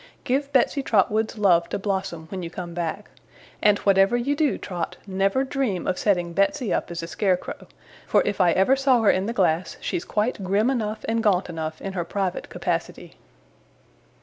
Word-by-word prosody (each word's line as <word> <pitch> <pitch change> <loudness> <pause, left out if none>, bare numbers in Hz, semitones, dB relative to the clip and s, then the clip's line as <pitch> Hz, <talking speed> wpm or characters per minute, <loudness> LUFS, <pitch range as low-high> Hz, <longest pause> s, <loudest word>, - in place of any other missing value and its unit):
'Give 275 +3 -1
Betsey 275 +2 +2
Trotwood's 220 -1 +1
love 175 -5 +3
to - - -2
Blossom, 190 -5 -3
when 190 -2 -4
you 170 - -5
come 175 0 -7
back; 175 +4 -4 0.5
and 210 -1 +5
whatever 195 +4 +3
you 275 +4 0
do, 295 -1 +1
Trot, 180 -3 -5
never 195 +6 +1
dream 260 -10 -2
of 185 - -1
setting 175 -4 +1
Betsey 200 +4 +1
up - - -1
as 170 -1 -5
a - - -5
scarecrow, 180 +2 -2 0.4
for - - +3
if 205 -1 0
I 175 -2 +5
ever 195 +8 +4
saw 265 -4 +3
her 210 - +6
in 190 +2 -1
the - - -1
glass, 180 -5 0
she's 170 - -3
quite 210 -1 -1
grim 205 +7 +2
enough 215 -4 -3
and 225 0 +1
gaunt 195 -4 +2
enough 160 -1 -5
in 195 - -4
her 175 -2 -2
private 185 +1 -3
capacity! - - -3
195 Hz, 185 wpm, -24 LUFS, 180-225 Hz, 0.5 s, her